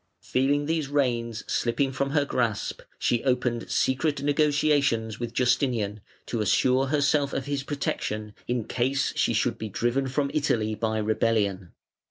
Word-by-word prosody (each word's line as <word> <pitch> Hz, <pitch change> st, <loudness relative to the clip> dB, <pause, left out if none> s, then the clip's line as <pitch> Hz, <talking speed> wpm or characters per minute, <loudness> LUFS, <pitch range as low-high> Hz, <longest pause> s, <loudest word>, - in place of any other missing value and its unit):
Feeling 140 Hz, +3 st, +1 dB
these 160 Hz, -1 st, 0 dB
reins 120 Hz, -5 st, 0 dB
slipping 125 Hz, +3 st, 0 dB
from 140 Hz, +1 st, -1 dB
her 145 Hz, 0 st, +2 dB
grasp, 115 Hz, -7 st, -1 dB, 0.2 s
she 120 Hz, -1 st, 0 dB
opened 125 Hz, -2 st, 0 dB
secret 140 Hz, +1 st, +1 dB
negotiations 145 Hz, -6 st, +2 dB
with 120 Hz, -1 st, -3 dB
Justinian 120 Hz, -5 st, +1 dB, 0.2 s
to 115 Hz, -, -2 dB
assure 130 Hz, +6 st, +3 dB
herself 145 Hz, 0 st, +2 dB
of 130 Hz, -, -2 dB
his 140 Hz, -1 st, -2 dB
protection 110 Hz, -7 st, -3 dB
in 120 Hz, -1 st, 0 dB
case 130 Hz, +4 st, 0 dB
she -, -, +2 dB
should -, -, 0 dB
be 110 Hz, -, -4 dB
driven 120 Hz, +6 st, 0 dB
from 140 Hz, +2 st, -1 dB
Italy 115 Hz, -8 st, +1 dB
by 110 Hz, 0 st, -1 dB
rebellion. 105 Hz, -4 st, 0 dB
125 Hz, 145 wpm, -26 LUFS, 115-140 Hz, 0.2 s, assure